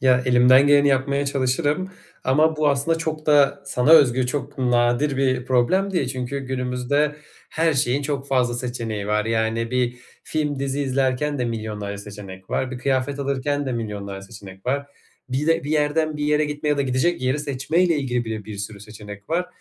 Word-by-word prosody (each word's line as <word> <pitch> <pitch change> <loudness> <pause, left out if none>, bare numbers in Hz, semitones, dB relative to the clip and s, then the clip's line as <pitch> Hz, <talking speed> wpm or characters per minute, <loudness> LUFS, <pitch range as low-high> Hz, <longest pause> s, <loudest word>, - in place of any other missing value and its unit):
Ya 125 -1 +4
elimden 125 +2 +6
geleni 145 0 +5
yapmaya 140 +1 +1
çalışırım 145 +7 0 0.3
ama 155 +4 +3
bu 150 -1 +2
aslında 145 +4 +1
çok 155 -1 -4
da 145 -1 +4
sana 130 +2 +1
özgü, 130 -5 +6
çok 135 0 -4
nadir 125 +3 +2
bir 130 -2 0
problem 180 +11 +2
değil 140 -8 0
çünkü 130 +1 -3
günümüzde 130 +3 -1 0.3
her 160 -1 +1
şeyin 135 +2 +1
çok 140 -1 -3
fazla 125 -3 +1
seçeneği 115 -4 -4
var 105 0 +1
yani 115 +1 -1
bir 125 -1 0 0.3
film, 150 -2 -2
dizi 140 +1 -2
izlerken 135 +1 0
de 125 - 0
milyonlarca 105 -3 -4
seçenek 100 -2 -10
var. 130 0 -1
Bir 130 - -6
kıyafet 135 +1 -1
alırken 140 +1 -1
de 130 - -2
milyonlarca 100 -4 -5
seçenek 95 -2 -12
var. 140 +2 -1 0.4
Bir 135 +4 -1
de, 165 -2 +2
bir 145 - -4
yerden 155 +1 +1
bir 150 - -2
yere 150 +1 +2
gitme 150 0 -3
ya 145 - +2
da 140 - +1
gidecek 130 +5 0
yeri 130 +3 +1
seçmeyle 150 +5 +1
ilgili 125 -4 -1
bile 110 -2 -5
bir 105 -2 -8
sürü 100 0 -5
seçenek 105 0 -11
var. 180 +2 0
130 Hz, 180 wpm, -22 LUFS, 120-145 Hz, 0.4 s, elimden